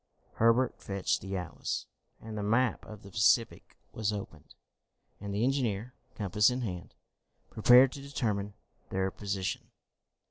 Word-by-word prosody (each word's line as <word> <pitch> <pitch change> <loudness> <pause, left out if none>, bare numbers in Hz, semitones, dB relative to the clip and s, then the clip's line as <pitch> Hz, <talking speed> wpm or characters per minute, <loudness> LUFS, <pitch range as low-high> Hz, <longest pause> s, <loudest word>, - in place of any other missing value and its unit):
Herbert 115 +3 +3
fetched 95 -1 -1
the 95 0 -4
atlas, 90 - -4 0.3
and 110 -1 -8
the 105 - -3
map 115 +4 +1
of 110 -1 -10
the 100 - -12
Pacific 115 +2 +2 0.2
was 110 -1 -1
opened, 100 -8 -8 0.6
and 100 0 -6
the 100 +3 0
engineer, 125 -3 0 0.2
compass 105 +1 +3
in 125 +1 -2
hand, 90 -7 -6 0.6
prepared 125 +4 +7
to 140 - -8
determine 105 -7 -2 0.3
their 95 0 -1
position. 100 -2 -4
105 Hz, 135 wpm, -30 LUFS, 100-120 Hz, 0.6 s, prepared